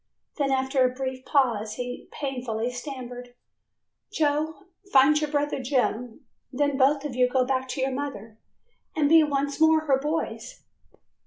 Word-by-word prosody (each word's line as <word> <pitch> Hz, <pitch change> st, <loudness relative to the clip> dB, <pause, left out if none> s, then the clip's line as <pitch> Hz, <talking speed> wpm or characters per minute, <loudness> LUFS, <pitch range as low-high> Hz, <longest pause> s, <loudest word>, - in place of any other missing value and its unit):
Then 280 Hz, -3 st, 0 dB
after 265 Hz, 0 st, +2 dB
a 255 Hz, -, +4 dB
brief 260 Hz, 0 st, -5 dB
pause 225 Hz, -6 st, +1 dB
he 245 Hz, 0 st, -6 dB
painfully 245 Hz, -4 st, -3 dB
stammered, 245 Hz, -1 st, -8 dB, 0.8 s
"Joe, 310 Hz, +1 st, 0 dB, 0.3 s
find 285 Hz, +3 st, +5 dB
your 300 Hz, -, -1 dB
brother 290 Hz, -2 st, -1 dB
Jim, 250 Hz, -1 st, -1 dB, 0.3 s
then 285 Hz, +1 st, 0 dB
both 280 Hz, +2 st, +3 dB
of 275 Hz, -4 st, -4 dB
you 250 Hz, 0 st, +3 dB
go 255 Hz, 0 st, +2 dB
back 260 Hz, 0 st, -1 dB
to 260 Hz, +1 st, -4 dB
your 265 Hz, +1 st, 0 dB
mother 230 Hz, -6 st, -6 dB, 0.6 s
and 300 Hz, -2 st, +2 dB
be 325 Hz, +2 st, +7 dB
once 285 Hz, 0 st, -1 dB
more 320 Hz, 0 st, +5 dB
her 275 Hz, -4 st, +2 dB
boys." 320 Hz, -, -4 dB
270 Hz, 150 wpm, -26 LUFS, 250-290 Hz, 0.8 s, be